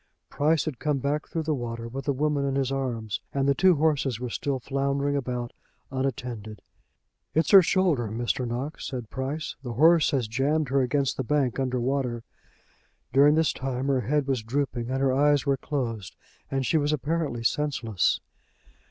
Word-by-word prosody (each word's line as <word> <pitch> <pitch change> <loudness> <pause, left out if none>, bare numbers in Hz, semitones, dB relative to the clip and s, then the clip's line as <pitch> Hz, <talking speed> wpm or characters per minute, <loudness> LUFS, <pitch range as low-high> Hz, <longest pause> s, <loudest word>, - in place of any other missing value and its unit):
Price 155 +1 +2
had 150 -7 -4
come 150 -2 0
back 145 +3 -2
through 165 - -3
the 155 0 0
water 115 -3 -4
with 130 +3 -6
the 145 - +2
woman 145 +1 0
in 135 -1 -1
his 135 -1 0
arms, 120 -6 -3
and 135 0 +1
the 140 - +5
two 185 +4 +4
horses 145 -6 +1
were 125 -1 -4
still 140 +2 -1
floundering 140 +2 -1
about, 125 -3 -3 0.4
unattended. 120 -5 -4 0.7
"It's 160 - +2
her 195 -2 +10
shoulder, 170 - +2
Mr. 120 +3 -2
Knox," 130 +6 -4
said 125 -4 -6
Price. 140 +4 -4
"The 125 -3 -5
horse 160 +6 +5
has 130 -5 0
jammed 140 +6 0
her 135 +1 +2
against 135 +1 0
the 130 - -1
bank 135 -1 0
under 130 -1 0
water." 125 -2 -1 0.9
During 145 +3 +6
this 160 0 +2
time 130 +1 -3
her 135 -2 +2
head 145 +5 0
was 130 -3 0
drooping, 120 0 -2
and 130 +1 -1
her 135 -1 +3
eyes 145 +1 +3
were 140 -1 +3
closed, 120 -8 -4 0.3
and 135 -1 -1
she 160 - +2
was 145 0 +1
apparently 150 -4 -1
senseless. 120 -7 0
135 Hz, 180 wpm, -26 LUFS, 125-145 Hz, 0.9 s, her